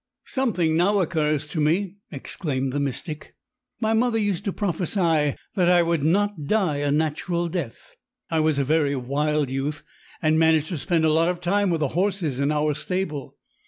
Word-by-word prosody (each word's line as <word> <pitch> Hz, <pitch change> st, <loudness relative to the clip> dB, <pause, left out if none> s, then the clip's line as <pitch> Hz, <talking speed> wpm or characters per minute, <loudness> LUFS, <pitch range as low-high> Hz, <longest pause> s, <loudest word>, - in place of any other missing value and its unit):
"Something 185 Hz, -12 st, 0 dB
now 195 Hz, +5 st, +3 dB
occurs 155 Hz, -4 st, 0 dB
to 155 Hz, -, -2 dB
me," 180 Hz, +6 st, +1 dB
exclaimed 135 Hz, -2 st, -3 dB
the 145 Hz, -, 0 dB
mystic; 145 Hz, +3 st, -5 dB, 0.4 s
"my 220 Hz, -1 st, +1 dB
mother 230 Hz, +1 st, +2 dB
used 205 Hz, -4 st, -1 dB
to 200 Hz, -, 0 dB
prophesy 170 Hz, -6 st, 0 dB, 0.2 s
that 180 Hz, -2 st, +2 dB
I 175 Hz, -1 st, +5 dB
would 170 Hz, -2 st, 0 dB
not 190 Hz, 0 st, +1 dB
die 185 Hz, -4 st, +1 dB
a 145 Hz, 0 st, 0 dB
natural 160 Hz, +3 st, 0 dB
death. 165 Hz, -9 st, -5 dB, 0.4 s
I 160 Hz, -, +2 dB
was 155 Hz, -2 st, +2 dB
a 140 Hz, -, +2 dB
very 145 Hz, 0 st, +2 dB
wild 145 Hz, +2 st, 0 dB
youth, 140 Hz, +3 st, -3 dB, 0.4 s
and 155 Hz, 0 st, +2 dB
managed 160 Hz, -1 st, +3 dB
to 170 Hz, -, -3 dB
spend 165 Hz, +1 st, +1 dB
a 155 Hz, -, +3 dB
lot 165 Hz, +2 st, +3 dB
of 180 Hz, -1 st, -2 dB
time 195 Hz, +3 st, +1 dB
with 165 Hz, -2 st, 0 dB
the 145 Hz, -, +1 dB
horses 175 Hz, -6 st, -1 dB
in 140 Hz, +1 st, +1 dB
our 150 Hz, 0 st, +1 dB
stable. 155 Hz, -2 st, -4 dB
160 Hz, 180 wpm, -24 LUFS, 150-185 Hz, 0.4 s, I